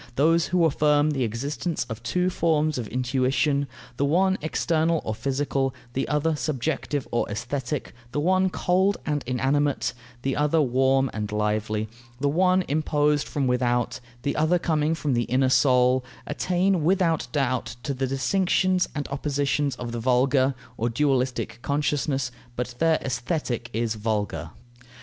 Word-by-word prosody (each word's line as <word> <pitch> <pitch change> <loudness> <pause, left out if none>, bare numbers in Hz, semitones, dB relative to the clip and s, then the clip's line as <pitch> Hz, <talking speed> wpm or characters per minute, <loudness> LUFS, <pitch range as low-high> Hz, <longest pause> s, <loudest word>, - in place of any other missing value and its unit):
Those 165 +4 +3
who 180 -2 +3
affirm 150 0 +3
the 135 -3 0
existence 140 +7 -2
of 115 -1 -6
two 180 +9 0
forms 155 -4 +1
of 115 - -4
intuition 135 +3 +1 0.3
the - - +1
one 185 +6 +3
external 160 +1 +1
or 110 - -1
physical, 135 +2 -1 0.2
the 135 - -1
other 150 +2 +1
subjective 145 -1 -2
or 120 - 0
aesthetic; 125 +5 -3 0.2
the 145 - -1
one 185 +4 +3
cold 190 +3 +1
and 150 -1 0
inanimate, 135 +3 +1 0.3
the 135 0 0
other 150 +2 +2
warm 135 -1 +2
and 105 -1 -4
lively; 105 0 -1 0.3
the 145 - +1
one 185 +4 +3
imposed 150 0 +1
from 140 -2 -1
without, 120 -1 0 0.2
the 140 - -1
other 155 +4 +3
coming 160 -2 +1
from 150 -4 -1
the 120 -1 +1
inner 130 +2 +2
soul 130 -1 +4 0.2
attain 180 -1 +1
without 170 -1 +2
doubt 130 -5 -1
to 140 - -2
the 135 0 -1
distinctions 185 +6 +1
and 145 -2 -3
oppositions 140 -1 0
of 120 -1 -6
the 120 - -3
vulgar 130 +2 +2 0.2
(or 115 +2 0
dualistic) 130 -1 0
consciousness, 140 -2 0 0.2
but 125 0 -3
their 165 -1 +4
Aesthetic 120 -2 -2
is 115 -1 -1
vulgar. 105 -1 -2
140 Hz, 145 wpm, -25 LUFS, 125-155 Hz, 0.3 s, soul